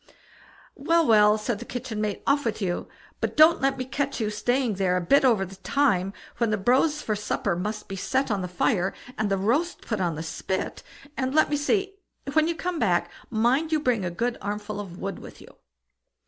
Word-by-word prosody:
"Well, 330 +4 +2
well!" 210 -2 +5
said 215 0 -2
the 240 - -7
kitchen 245 -4 -5
maid, 210 -2 -2
"off 285 +1 +2
with 225 -2 -2
you; 180 -4 -2 0.3
but - - -3
don't 310 +1 +7
let 270 0 +1
me 255 - -3
catch 275 +1 -2
you 215 -2 -1
staying 245 +3 0
there 185 -2 +1
a - - 0
bit 275 +12 +4
over 225 -7 +3
the 190 +1 -12
time 195 -4 +1 0.3
when 235 -2 +2
the 215 - +1
brose 265 +9 +2
for 215 - -1
supper 205 -2 -1
must 210 +4 -4
be 195 - -5
set 260 +7 -1
on 200 -2 0
the 180 - -3
fire, 180 +2 0 0.2
and 215 -3 -1
the 195 - +1
roast 280 - 0
put 215 -4 -3
on 170 -3 0
the 160 - -5
spit; 185 +4 -3 0.3
and 260 +1 -2
let 310 - +4
me - - +2
see; 390 +7 0 0.4
when 315 +1 +4
you 335 - -1
come 350 0 -3
back, 180 -8 +1 0.2
mind 245 +8 +1
you 310 - +3
bring 250 -8 +1
a 180 - -1
good 235 +8 -2
armful 205 +1 -4
of 185 -4 -7
wood 195 0 -5
with - - -12
you." - - -15
220 Hz, 215 wpm, -26 LUFS, 195-275 Hz, 0.4 s, don't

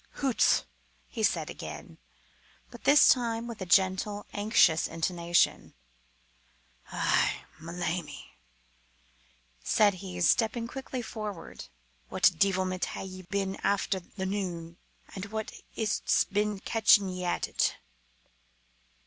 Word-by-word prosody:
"Hoots!" 270 -4 +2 0.5
he - - -5
said - - +1
again, - - -9 0.7
but 240 - -13
this 290 +1 +7
time 230 -2 +2
with 235 -4 -8
a 185 - -4
gentle, 190 +3 +2
anxious 205 -6 +3
intonation. 170 +1 0 1.2
"Eh! - - +1 0.2
ma 165 +2 -8
lammie," 170 - -4 1.3
said 210 -2 +4
he, 180 -2 -7
stepping 225 +5 +2
quickly 260 0 -6
forward, 210 -6 -7 0.4
"what - - +4
deevilment 185 0 +1
hae - - -6
ye 185 0 -8
been 195 +1 -3
after 200 -1 0
the 190 +2 -7
noo, 175 -4 -4 0.4
and 190 0 -5
wha 220 +1 -3 0.3
is't's 215 -2 +1
been 210 0 -1
catching 215 -2 +4
ye 185 0 -5
at 175 - -1
it?" - - 0
195 Hz, 115 wpm, -29 LUFS, 180-215 Hz, 1.3 s, this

